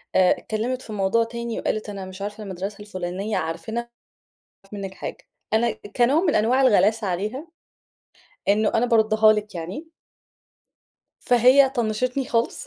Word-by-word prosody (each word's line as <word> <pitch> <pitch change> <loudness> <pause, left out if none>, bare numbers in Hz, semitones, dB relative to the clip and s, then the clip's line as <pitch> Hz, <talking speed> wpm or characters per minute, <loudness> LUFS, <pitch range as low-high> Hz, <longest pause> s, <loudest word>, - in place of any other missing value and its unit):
آآ، 185 -1 +5
اتكلمت 240 +4 -3
في 220 - -9
موضوع 200 +3 +2
تاني 235 0 -5
وقالت 215 0 -2
أنا 195 -2 -6
مش 185 +1 -10
عارفة 210 +2 -5
المدرسة 195 +1 -6
الفُلانية 195 0 -4
عارفينها؟ 185 +8 -3
"مش 235 - -26 0.8
عايزين 200 +1 -9
نعرف - - -5
منِك - - -15
حاجة." - - -6 0.4
أنا 230 +1 +3 0.2
كنوع 260 +6 +3
من 340 -5 +1
أنواع 240 +5 +3
الغلاسة 215 -3 +3
عليها، 210 - -3 1.0
إنه 210 +1 +3
أنا 235 +2 +3
باردها 220 -2 +4
لِك 210 -1 -4
يعني. 180 - -6 1.4
فهي 255 +3 +5
طنشتني 250 +2 -1
خالص، 235 - -1
215 Hz, 145 wpm, -23 LUFS, 200-240 Hz, 1.4 s, آآ